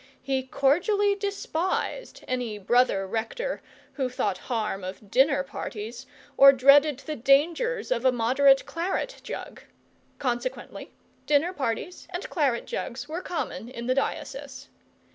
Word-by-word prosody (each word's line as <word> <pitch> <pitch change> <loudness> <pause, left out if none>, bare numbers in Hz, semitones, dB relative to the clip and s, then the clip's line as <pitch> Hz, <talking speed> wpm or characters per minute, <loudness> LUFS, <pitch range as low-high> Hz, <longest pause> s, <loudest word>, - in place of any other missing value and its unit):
He 265 0 0
cordially 360 - +2
despised 400 +2 -3
any 245 -4 -2
brother 205 -1 +2
rector 475 - -3 0.3
who 265 -3 -1
thought 210 -7 -2
harm 215 -5 -3
of 195 +2 -8
dinner 275 +2 +4
parties, 240 -2 -7 0.3
or 275 0 +10
dreaded 280 +2 +5
the 310 0 -5
dangers 330 - +2
of 240 -1 +1
a 260 - +5
moderate 265 +3 +4
claret 375 +9 -3
jug; - - -7 0.6
consequently 255 - -4 0.4
dinner 300 +5 +3
parties 275 +5 -4
and 365 +1 -5
claret 275 -7 +1
jugs 240 +3 -5
were 325 +4 -4
common 240 - -4
in 235 -2 -7
the 255 - +2
diocese. 275 - -4
270 Hz, 125 wpm, -26 LUFS, 240-335 Hz, 0.6 s, or